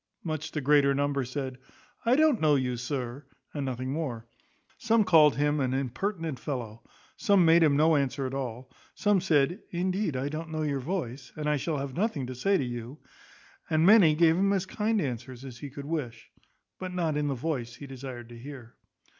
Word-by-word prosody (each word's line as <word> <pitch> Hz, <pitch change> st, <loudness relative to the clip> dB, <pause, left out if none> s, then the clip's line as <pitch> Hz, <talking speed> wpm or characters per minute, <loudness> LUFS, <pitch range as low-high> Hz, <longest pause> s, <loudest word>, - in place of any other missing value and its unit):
Much 155 Hz, -2 st, -3 dB
the 150 Hz, -, -3 dB
greater 140 Hz, 0 st, +4 dB
number 140 Hz, -1 st, 0 dB
said, 130 Hz, 0 st, -5 dB, 0.5 s
I 245 Hz, -, +5 dB
don't 305 Hz, -5 st, +3 dB
know 150 Hz, -2 st, +4 dB
you, 125 Hz, -2 st, 0 dB
sir, 125 Hz, +2 st, -4 dB, 0.3 s
and 145 Hz, -, -3 dB
nothing 130 Hz, 0 st, -3 dB
more. 130 Hz, -8 st, -4 dB, 0.5 s
Some 225 Hz, -1 st, +3 dB
called 160 Hz, -6 st, +6 dB
him 145 Hz, +1 st, +1 dB
an 130 Hz, -1 st, 0 dB
impertinent 160 Hz, -, -3 dB
fellow; 120 Hz, -5 st, -5 dB, 0.4 s
some 200 Hz, -4 st, +4 dB
made 165 Hz, +1 st, +6 dB
him 150 Hz, -3 st, +4 dB
no 160 Hz, +1 st, +4 dB
answer 140 Hz, -1 st, 0 dB
at 130 Hz, -, -4 dB
all; 130 Hz, -2 st, -5 dB, 0.2 s
some 205 Hz, -3 st, +2 dB
said, 170 Hz, +1 st, +2 dB
Indeed 185 Hz, -2 st, -1 dB
I 130 Hz, +2 st, -2 dB
don't 155 Hz, +2 st, -5 dB
know 155 Hz, -1 st, -2 dB
your 145 Hz, -2 st, -1 dB
voice, 135 Hz, -4 st, -4 dB
and 150 Hz, -1 st, -4 dB
I 150 Hz, 0 st, +2 dB
shall 150 Hz, +2 st, -2 dB
have 135 Hz, -1 st, -4 dB
nothing 185 Hz, -, -1 dB
to 130 Hz, -, -6 dB
say 195 Hz, +11 st, +2 dB
to 135 Hz, -, -1 dB
you; 120 Hz, +3 st, -6 dB, 0.7 s
and 160 Hz, +1 st, +3 dB
many 190 Hz, -6 st, +7 dB
gave 165 Hz, 0 st, +4 dB
him 195 Hz, +1 st, +3 dB
as 190 Hz, -1 st, 0 dB
kind 215 Hz, +3 st, 0 dB
answers 130 Hz, -, -5 dB
as 125 Hz, -2 st, -9 dB
he 145 Hz, -, -7 dB
could 140 Hz, +1 st, -8 dB
wish, 140 Hz, -8 st, -5 dB, 0.5 s
but 185 Hz, -1 st, -5 dB
not 170 Hz, -4 st, -1 dB
in 150 Hz, 0 st, 0 dB
the 140 Hz, -, -1 dB
voice 120 Hz, -4 st, -3 dB
he 140 Hz, -, -10 dB
desired 130 Hz, -3 st, -8 dB
to 120 Hz, -1 st, -11 dB
hear. 130 Hz, -3 st, -10 dB
145 Hz, 195 wpm, -28 LUFS, 130-165 Hz, 0.7 s, many